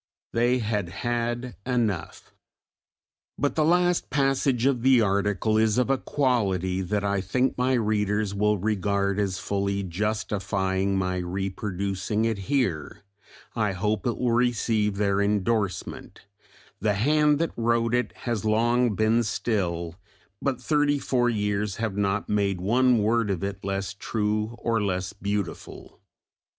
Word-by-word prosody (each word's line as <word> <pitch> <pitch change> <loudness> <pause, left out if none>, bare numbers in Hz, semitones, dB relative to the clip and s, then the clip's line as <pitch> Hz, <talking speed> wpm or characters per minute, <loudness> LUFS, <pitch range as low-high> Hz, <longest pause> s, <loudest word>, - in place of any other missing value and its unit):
They 120 +2 +3
had 105 -6 -2
had 120 +4 -3
enough! 110 -10 -2 1.0
But 145 - 0
the 155 - +2
last 175 +2 +2
passage 135 -3 +1
of 135 -3 +2
the 130 0 +5
article 105 +1 +1
is 110 0 +2
of 125 +1 +2
a 135 - +1
quality 95 - 0
that 100 +2 -1
I 100 -1 0
think 125 +8 0
my 125 +1 +1
readers 105 -3 0
will 105 +1 +2
regard 100 0 0
as 95 -2 -1
fully 100 0 -1
justifying 95 0 -1
my 90 -1 -1
reproducing 95 +3 -2
it 110 -3 -1
here, 95 - -1 0.5
I 105 -4 0
hope 105 +5 -1
it 120 - -1
will 125 -1 0
receive 115 -4 +1
their 100 -1 +1
endorsement 100 -1 -1 0.6
the 105 -1 +1
hand 150 +6 +3
that 165 +1 -1
wrote 115 0 +1
it 125 -3 +1
has 115 -5 -2
long 115 +1 +2
been 110 +3 +3
still, 90 -7 -2 0.4
but 135 -3 -1
thirty 145 +2 +2
four 125 -3 +1
years 105 -2 -1
have 115 -3 -3
not 100 0 0
made 100 -3 0
one 120 +4 +3
word 115 0 +2
of 95 -2 -2
it 100 0 -4
less 100 0 -2
true 105 +2 -2
or 115 -2 0
less 95 -2 -2
beautiful. 100 -2 -5
105 Hz, 140 wpm, -26 LUFS, 100-120 Hz, 1.0 s, the